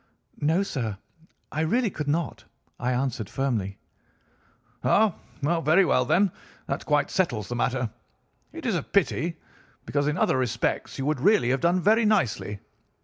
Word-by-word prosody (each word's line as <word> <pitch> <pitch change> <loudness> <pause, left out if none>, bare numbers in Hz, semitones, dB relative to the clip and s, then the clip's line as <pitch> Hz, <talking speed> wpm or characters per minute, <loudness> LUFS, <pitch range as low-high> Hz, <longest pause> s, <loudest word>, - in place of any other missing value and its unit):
"'No, 160 +6 +2
sir, 115 - -3 0.5
I 155 - -1
really 225 +7 +1
could 150 -3 -5
not,' 155 0 -1 0.4
I 125 - 0
answered 125 -5 -1
firmly. 110 -8 -2 1.1
"'Ah, 215 -3 +4 0.3
very 165 +4 +3
well; 125 -6 +2
then 190 +8 +3 0.3
that - - -4
quite 150 -1 +2
settles 120 - 0
the 120 - -2
matter. 125 0 0 0.6
It - - -9
is - - +1
a - - 0
pity, 165 +1 0 0.5
because 145 0 0
in 150 +2 0
other 130 - +2
respects 120 -3 -1
you 135 - -2
would 150 -2 0
really 200 - +4
have 135 - 0
done 175 +2 +3
very 220 +5 +4
nicely. 125 - +1
145 Hz, 150 wpm, -26 LUFS, 125-175 Hz, 1.1 s, Ah